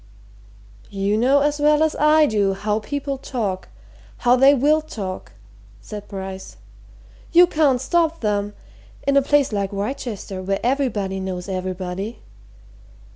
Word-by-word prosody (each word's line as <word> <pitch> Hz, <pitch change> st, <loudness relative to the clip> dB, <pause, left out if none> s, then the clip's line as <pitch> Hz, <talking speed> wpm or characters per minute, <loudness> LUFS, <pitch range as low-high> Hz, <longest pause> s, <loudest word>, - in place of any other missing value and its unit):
"You 200 Hz, +1 st, -1 dB
know 260 Hz, +6 st, +3 dB
as 295 Hz, +1 st, 0 dB
well 300 Hz, +1 st, +4 dB
as 315 Hz, -, 0 dB
I 305 Hz, +1 st, +5 dB
do 205 Hz, -6 st, +1 dB
how 210 Hz, +2 st, -1 dB
people 280 Hz, +4 st, -4 dB
talk, 210 Hz, -9 st, -3 dB, 0.5 s
how 245 Hz, 0 st, +4 dB
they 270 Hz, +3 st, +6 dB
will 300 Hz, +4 st, +3 dB
talk," 195 Hz, -, -7 dB, 0.5 s
said 205 Hz, -, -9 dB
Bryce. 190 Hz, -1 st, -7 dB, 0.8 s
"You 350 Hz, +1 st, +8 dB
can't 300 Hz, -7 st, +2 dB
stop 330 Hz, +4 st, +1 dB
them, 205 Hz, -1 st, -1 dB, 0.5 s
in 280 Hz, -, +2 dB
a 280 Hz, -, +6 dB
place 280 Hz, -2 st, +2 dB
like 200 Hz, -1 st, -1 dB
Wrychester, 205 Hz, -2 st, -4 dB
where 195 Hz, +1 st, -1 dB
everybody 230 Hz, -7 st, -1 dB
knows 185 Hz, -1 st, -5 dB
everybody. 185 Hz, +3 st, -4 dB
220 Hz, 130 wpm, -21 LUFS, 195-285 Hz, 0.8 s, You